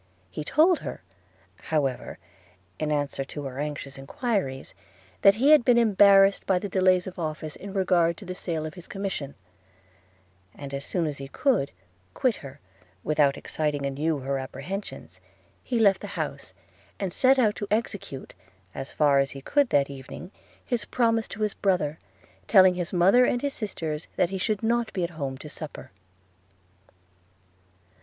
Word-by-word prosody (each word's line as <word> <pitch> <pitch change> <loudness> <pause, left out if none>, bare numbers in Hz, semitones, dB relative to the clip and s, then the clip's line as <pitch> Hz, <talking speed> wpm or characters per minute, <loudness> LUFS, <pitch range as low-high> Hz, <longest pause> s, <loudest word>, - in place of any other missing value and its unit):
He 150 - -5
told 320 - +4
her, - - -7 0.5
however, 140 -5 -2 0.6
in 155 -1 -1
answer 145 -2 -1
to 145 +2 -7
her 135 -1 -6
anxious 145 -2 -5
enquiries, 140 - -2 0.5
that 195 - +7
he 270 +7 +4
had 305 -5 +7
been 245 -1 +4
embarrassed 200 -3 +5
by 190 - +3
the 205 - -3
delays 185 -1 +3
of 185 -1 -8
office 155 -1 -4
in 200 - -8
regard 180 -4 +2
to 205 - -11
the 185 - -5
sale 165 -3 -3
of 155 - -6
his 175 +1 -11
commission; 195 -8 -4 1.2
and 140 -1 -8
as 140 0 -4
soon 175 -3 -1
as 150 -3 -4
he 135 - -6
could 200 - +1 0.4
quit 250 -4 +1
her 140 0 -11 0.4
without 150 -2 +2
exciting 150 -2 -2
anew 150 +3 -1
her 135 +1 -2
apprehensions, 140 +10 -7 0.4
he 245 - -2
left 200 -4 +4
the - - -6
house, - - -4 0.5
and 190 -3 -3
set 265 +1 +4
out 220 -5 +3
to 205 - -4
execute, 205 - -3 0.4
as 135 +1 -6
far 145 -2 +3
as 135 0 +1
he 135 - -9
could 285 - +2
that 140 -1 +3
evening, 140 +7 -9 0.3
his 240 -3 -1
promise 230 -1 +1
to 210 - -8
his 210 - 0
brother, 175 -6 0 0.5
telling 190 -3 +7
his 175 -2 -3
mother 190 +8 +5
and 245 0 +1
his 285 -1 -1
sisters 160 -8 -4
that 180 - +1
he 190 - -3
should 210 +3 -1
not 235 0 +1
be 185 - -1
at 170 - -2
home 140 -5 -4
to 150 - -10
supper. 150 0 -9
180 Hz, 165 wpm, -26 LUFS, 145-205 Hz, 1.2 s, that